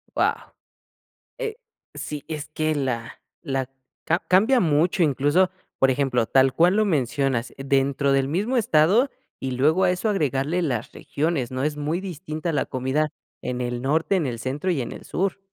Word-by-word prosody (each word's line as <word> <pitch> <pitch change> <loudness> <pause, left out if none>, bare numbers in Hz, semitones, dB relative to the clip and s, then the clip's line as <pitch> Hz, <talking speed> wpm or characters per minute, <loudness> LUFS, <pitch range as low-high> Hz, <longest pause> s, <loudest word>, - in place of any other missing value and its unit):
Guau, - - +3 1.0
eh, 445 -3 -3 0.4
sí, 150 -2 -6
es 155 -2 -5
que 155 0 -1
la 125 -5 -3 0.2
la 135 -4 -2 0.4
cam 170 +2 +2
cambia 220 +8 +5
mucho 170 +2 +2
incluso, 150 +5 +3 0.3
por 135 - +4
ejemplo, 130 -3 +1
tal 135 +1 +4
cual 175 +6 +4
lo 215 - +4
mencionas, 135 - 0
dentro 140 0 +1
del 135 -1 +2
mismo 205 - 0
estado 215 - +4 0.3
y 135 -1 -3
luego 155 +9 +3
a 180 - +4
eso 180 +5 -1
agregarle 155 - 0
las 120 -7 -2
regiones, 145 -4 -2
¿no?, 130 +1 -2
es 150 0 -1
muy 150 +4 -1
distinta 170 -3 -4
la 150 - 0
comida 130 +4 -1 0.3
en 125 0 -3
el 120 0 -3
norte, 160 +8 +1
en 170 -6 0
el 120 -3 -3
centro 135 +9 -2
y 160 -7 0
en 120 - -4
el - - -10
sur. 195 +1 -1
150 Hz, 170 wpm, -24 LUFS, 135-180 Hz, 1.0 s, cambia